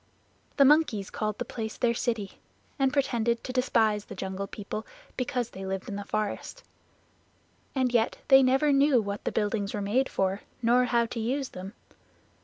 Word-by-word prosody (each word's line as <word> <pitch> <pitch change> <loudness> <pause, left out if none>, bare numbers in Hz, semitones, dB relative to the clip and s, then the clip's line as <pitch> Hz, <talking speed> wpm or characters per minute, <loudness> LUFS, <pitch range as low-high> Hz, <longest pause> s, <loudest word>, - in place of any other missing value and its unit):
The 280 - +7
monkeys 265 -9 +3
called 215 -1 -2
the 245 - -3
place 220 -2 -5
their 235 -1 +2
city, 230 -4 -3 0.4
and 270 -1 +3
pretended 235 -5 0
to 255 - -5
despise 220 -5 +2
the - - -9
Jungle 190 +1 -4
People 210 +2 -6 0.3
because 250 -2 -2
they 190 - -8
lived 190 0 -4
in 200 - -4
the 205 - -4
forest. 215 - -3 1.1
And 255 -2 +1
yet 230 -1 +2
they 270 -1 +9
never 270 +3 +3
knew 275 -2 +5
what 200 -2 -4
the - - 0
buildings 205 -1 -1
were - - -2
made 225 +7 +1
for 190 +1 -1 0.2
nor 245 +1 +4
how 235 -1 +2
to 230 0 -5
use 260 +4 -1
them. 190 +2 -8
230 Hz, 175 wpm, -28 LUFS, 205-255 Hz, 1.1 s, they